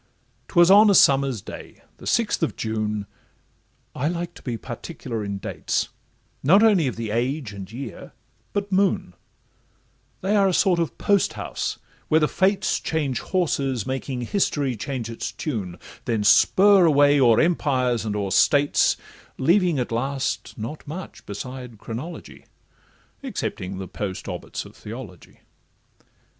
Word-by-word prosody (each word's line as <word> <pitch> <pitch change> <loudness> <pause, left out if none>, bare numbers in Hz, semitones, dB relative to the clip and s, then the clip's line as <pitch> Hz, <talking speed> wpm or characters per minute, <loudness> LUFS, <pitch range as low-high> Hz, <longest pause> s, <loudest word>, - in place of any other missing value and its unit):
'Twas 175 0 +5
on 210 +2 +8
a 200 - +5
summer's 135 - +4
day—the - - -11
sixth - - +1
of - - 0
June:— 105 -2 -2 0.9
I 140 - -1
like 175 +1 -3
to - - -14
be 120 -3 -4
particular 120 -1 -6
in 100 -1 -3
dates, - - -2 0.5
Not 190 +10 +5
only 200 -9 +4
of 125 - -3
the 115 -2 -4
age, 125 0 -1
and 100 0 -8
year, 130 +4 -8 0.4
but 200 0 -3
moon; 190 - +1 1.1
They 195 +3 +1
are 200 -1 +4
a 185 - +1
sort 185 -4 +3
of 165 - -2
post 200 -2 +2
house, - - -4 0.3
where 155 - +4
the 150 - +3
Fates 190 +3 +1
Change 145 -7 -1
horses, 140 - -1
making 130 -1 -3
history 140 - 0
change 125 +1 -4
its 115 -1 -5
tune, 100 - -4 0.3
Then 110 -3 0
spur 190 - +6
away 145 -2 +5
o'er 120 -4 +5
empires 130 -8 +1
and 105 -2 -3
o'er 100 -2 -2
states, 145 +6 +3 0.4
Leaving 175 +2 +3
at 125 -2 -2
last 135 +4 -2
not 120 +8 -7
much 170 +5 -8
besides 125 +3 -7
chronology, 115 - -8 0.7
Excepting 95 +1 -4
the 95 0 -6
post 95 -1 -5
obits - - -5
of - - -14
theology. 105 -5 -10
135 Hz, 140 wpm, -23 LUFS, 115-170 Hz, 1.1 s, on